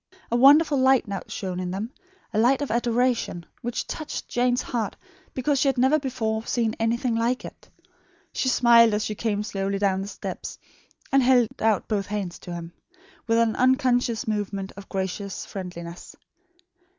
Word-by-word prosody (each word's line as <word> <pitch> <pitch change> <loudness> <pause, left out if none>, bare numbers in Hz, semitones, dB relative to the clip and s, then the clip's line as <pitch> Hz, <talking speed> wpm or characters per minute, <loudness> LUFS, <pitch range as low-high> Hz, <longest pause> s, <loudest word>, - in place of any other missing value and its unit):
A - - +2
wonderful 285 +3 +6
light 260 -2 +4
now 195 -2 -3
shone 185 -3 -4
in 180 -1 -3
them; 200 +6 -4 0.4
a 215 - +1
light 260 +5 +3
of 285 - -4
adoration, 235 -6 0 0.2
which 240 0 -3
touched 310 - -5
Jane's 245 0 +1
heart 230 -4 -3 0.4
because 270 +2 +1
she 280 - +2
had 270 -1 +1
never 265 +5 +4
before 225 -5 -2
seen 230 -2 0
anything 235 +2 0
quite - - 0
like 250 +2 0
it. - - -12 0.6
She 260 - 0
smiled 235 -3 +6
as 210 - -1
she 215 - -2
came 210 -1 -1
slowly 195 -1 -2
down 195 -1 +1
the 195 - -5
steps, - - -6 0.5
and 275 -1 +5
held 245 -3 +4
out 220 -3 +1
both 200 -3 -1
hands 200 -4 -4
to 175 - -8
him 170 0 -8 0.5
with 230 0 +3
an 230 -1 +2
unconscious 250 -3 +2
movement 200 -2 -2
of 200 0 -11
gracious 190 +1 -4
friendliness. 175 -2 -8
225 Hz, 170 wpm, -25 LUFS, 200-250 Hz, 0.6 s, wonderful